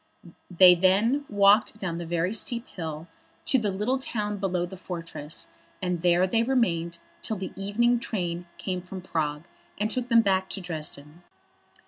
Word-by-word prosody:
Then 180 Hz, -1 st, +7 dB
they 205 Hz, +9 st, +4 dB
walked 205 Hz, +1 st, +4 dB
down 175 Hz, -4 st, -3 dB
the 170 Hz, -, -6 dB
very 175 Hz, +3 st, 0 dB
steep 235 Hz, +2 st, -2 dB
hill 160 Hz, -2 st, -6 dB, 0.4 s
to 265 Hz, -, +3 dB
the 215 Hz, -3 st, 0 dB
little 210 Hz, +7 st, 0 dB
town 210 Hz, -5 st, -2 dB
below 185 Hz, -3 st, -1 dB
the 185 Hz, +2 st, -9 dB
fortress, 165 Hz, -4 st, -5 dB, 0.3 s
and 180 Hz, -2 st, -2 dB
there 175 Hz, +1 st, +4 dB
they 225 Hz, +5 st, +2 dB
remained 175 Hz, -10 st, +1 dB, 0.2 s
till 220 Hz, -, -2 dB
the 190 Hz, -, -6 dB
evening 230 Hz, +5 st, +1 dB
train 175 Hz, -6 st, -3 dB
came 185 Hz, -2 st, -3 dB
from 185 Hz, 0 st, -8 dB
Prague, 150 Hz, -4 st, -2 dB, 0.4 s
and 215 Hz, +2 st, 0 dB
took 250 Hz, +1 st, -1 dB
them 230 Hz, -1 st, +6 dB
back 190 Hz, -2 st, +1 dB
to -, -, -4 dB
Dresden. 155 Hz, -2 st, -6 dB
190 Hz, 160 wpm, -27 LUFS, 170-215 Hz, 0.4 s, Then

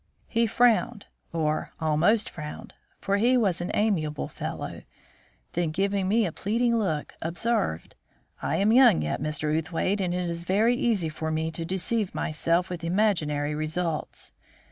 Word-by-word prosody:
He 230 Hz, 0 st, +1 dB
frowned, 235 Hz, -1 st, +2 dB, 0.3 s
or 155 Hz, -2 st, -1 dB
almost 160 Hz, +8 st, +2 dB
frowned, 150 Hz, -2 st, -8 dB, 0.2 s
for 200 Hz, 0 st, 0 dB
he 245 Hz, +5 st, +4 dB
was 195 Hz, -8 st, +1 dB
an 175 Hz, -, -3 dB
amiable 165 Hz, -9 st, 0 dB
fellow; -, -, -6 dB, 0.7 s
then, 170 Hz, -1 st, 0 dB
giving 195 Hz, +3 st, 0 dB
me 220 Hz, +3 st, +3 dB
a 170 Hz, -, -2 dB
pleading 230 Hz, +6 st, +1 dB
look, 160 Hz, -8 st, -2 dB
observed: 170 Hz, -, -1 dB, 0.5 s
"I -, -, -1 dB
am 205 Hz, +3 st, +3 dB
young 240 Hz, -, +6 dB
yet, 75 Hz, +9 st, -2 dB
Mr. 155 Hz, 0 st, 0 dB
Outhwaite, 170 Hz, +5 st, -1 dB
and 180 Hz, -2 st, 0 dB
it 180 Hz, 0 st, -1 dB
is 170 Hz, 0 st, -4 dB
very 215 Hz, +7 st, +3 dB
easy 215 Hz, -10 st, +1 dB
for 160 Hz, +1 st, -4 dB
me 160 Hz, +1 st, -1 dB
to 165 Hz, +1 st, -4 dB
deceive 190 Hz, +3 st, -1 dB
myself 170 Hz, +3 st, 0 dB
with 175 Hz, -2 st, -6 dB
imaginary 165 Hz, -6 st, +1 dB
results. 155 Hz, +1 st, -3 dB
175 Hz, 150 wpm, -26 LUFS, 155-210 Hz, 0.7 s, young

